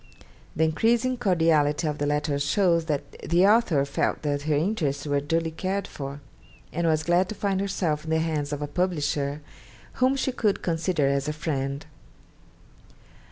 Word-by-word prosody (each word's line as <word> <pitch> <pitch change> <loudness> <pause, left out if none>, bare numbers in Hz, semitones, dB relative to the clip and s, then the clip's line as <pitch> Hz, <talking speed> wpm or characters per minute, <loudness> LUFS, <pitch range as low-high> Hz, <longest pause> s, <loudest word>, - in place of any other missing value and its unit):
The 160 - +2
increasing 230 +10 +2
cordiality 165 -8 +2
of 150 -1 -3
the 145 - 0
letters 150 -1 0
shows 170 +1 +2
that 150 -3 -3
the 175 +4 +3
author 200 -10 +4
felt 140 - -1
that 145 -1 -1
her 150 - +3
interests 150 -4 -1
were 145 -1 +1
duly 165 +3 -1
cared 190 +4 -2
for, 140 -4 -7 0.5
and 170 +1 0
was 155 -1 +2
glad 175 +3 +2
to 215 - -5
find 195 -1 -1
herself 175 -6 -1
in 160 - -7
the 160 - +2
hands 155 -3 -1
of 145 0 -3
a - - -3
publisher 150 -4 -1 0.6
whom 260 +2 +4
she 265 0 0
could 215 -5 0
consider 165 -2 0
as 140 +1 +1
a 150 - -1
friend. 140 -3 -3
160 Hz, 165 wpm, -26 LUFS, 145-185 Hz, 0.6 s, author